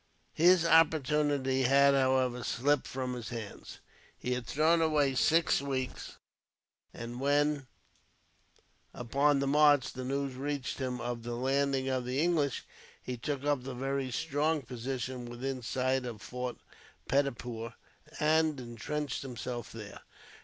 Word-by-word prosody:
His 175 +1 +5
opportunity 150 -4 +3
had, 140 +2 +5
however, 130 -2 +2
slipped 140 +4 +1
from 130 -1 -3
his 120 -3 -6
hands. 115 -4 -7 0.4
He 125 - -2
had 125 -1 -4
thrown 160 +3 +3
away 150 -4 +2
six 160 +3 +3
weeks; 130 -2 -4 0.7
and 120 +1 -7
when, 145 0 +1 1.3
upon 140 +4 +2
the 140 - 0
march, 145 -1 +4
the 130 - -6
news 135 +1 -2
reached 140 +1 -3
him 125 -2 -2
of 120 -1 -4
the 120 +1 -4
landing 135 +1 +1
of 130 -2 -1
the 125 +2 -1
English, 155 -5 +1 0.4
he 125 - -4
took 140 +3 -4
up 145 -2 +1
the 130 0 -6
very 135 +1 -2
strong 155 +2 0
position 125 +1 -4
within 130 +2 -4
sight 130 +2 0
of 115 -3 -6
the 100 - -15
fort 125 0 -4 0.5
Peddapur, 120 -4 -1 0.4
and 155 -1 +2
intrenched 125 +4 -4
himself 125 -2 -6
there. 110 -3 -9
135 Hz, 135 wpm, -31 LUFS, 125-145 Hz, 1.3 s, His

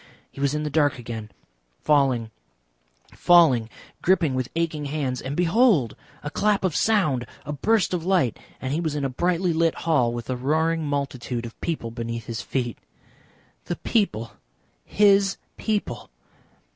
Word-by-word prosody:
He 140 - -9
was 140 +1 +1
in 150 - -1
the 150 - -3
dark 145 -1 +2
again, 115 -3 -7 0.5
falling, 130 -6 +2 0.8
falling, 150 -10 +5 0.3
gripping 170 -6 +2
with 130 -1 -2
aching 160 -3 -1
hands, 140 -3 -2
and 135 +2 -4
behold! 175 - +3 0.3
a 150 - -4
clap 205 +2 +1
of 180 -5 0
sound, 165 - +2 0.2
a 150 - -4
burst 210 +7 +1
of 175 -3 -1
light, 180 - +1 0.2
and 130 +1 -3
he 160 - 0
was 160 -3 -2
in 145 -2 -1
a - - 0
brightly 175 +5 0
lit 165 0 +2
hall 140 -8 +3
with 120 -1 -5
a 130 - -1
roaring 160 +5 0
multitude 135 -4 -3
of 115 - -11
people 150 -9 -3
beneath 115 -1 -5
his 115 0 -4
feet. 120 -3 -3 0.9
The - - -2
people! 115 - -1 0.5
His 200 -1 +4 0.2
people! 205 - -3
145 Hz, 155 wpm, -24 LUFS, 125-170 Hz, 0.9 s, falling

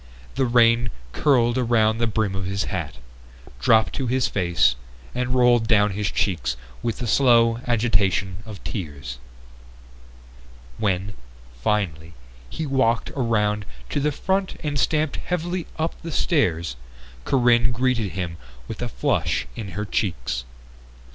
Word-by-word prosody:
The 130 0 +1
rain 120 0 +4 0.2
curled 125 - +2
around 115 -2 +2
the 115 - +2
brim 110 -2 0
of 95 -1 -3
his 100 +1 -1
hat, 80 -6 -3 0.6
dropped 110 - +4
to 135 - -2
his 130 +1 +2
face, 85 -9 +2 0.4
and 125 0 -1
rolled 120 -2 +4
down 105 -2 +4
his 105 +1 -1
cheeks 85 -10 -1 0.2
with 115 -2 -2
the 125 - -4
slow 115 -1 +4
agitation 100 -5 +1
of 110 -4 -10
tears. 70 - -6 1.6
When, 100 -1 0 0.5
finally, 85 - -1 0.3
he 160 - -4
walked 130 -5 +1
around 105 -5 0 0.3
to - - 0
the 150 +1 +1
front 190 +6 -1
and 145 -2 -1
stamped 155 +3 +1
heavily 175 0 -3
up 160 +1 -1
the 165 - -6
stairs, 85 - +1 0.5
Corinne 120 - +3
greeted 120 -4 0
him 90 -3 -4 0.3
with - - -6
a - - -2
flush - - 0
in 100 -6 -6
her 105 - -2
cheeks. 60 - -2
115 Hz, 135 wpm, -23 LUFS, 95-125 Hz, 1.6 s, rain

